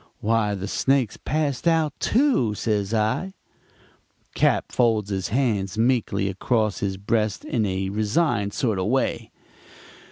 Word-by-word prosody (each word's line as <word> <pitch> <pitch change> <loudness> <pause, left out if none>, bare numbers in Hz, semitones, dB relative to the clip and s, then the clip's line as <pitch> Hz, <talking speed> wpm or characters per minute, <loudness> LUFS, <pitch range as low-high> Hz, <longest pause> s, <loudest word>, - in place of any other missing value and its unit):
"'Why, 110 -1 +1
the 95 0 -5
snake's 130 +1 +1
passed 150 0 -2
out, 160 -3 +2
too,' 235 - +2
says 105 -2 -1
I. 115 - -1 1.0
"Cap. - - +1
folds 110 -4 +1
his 95 -1 -2
hands 105 -6 0
meekly 115 -5 +1
across 110 +2 0
his 95 -1 -2
breast 105 +1 -1
in 110 -3 0
a 95 0 -2
resigned 105 - 0
sort 110 -7 0
of 95 - -1
way. 130 +4 0
110 Hz, 130 wpm, -24 LUFS, 100-130 Hz, 1.0 s, out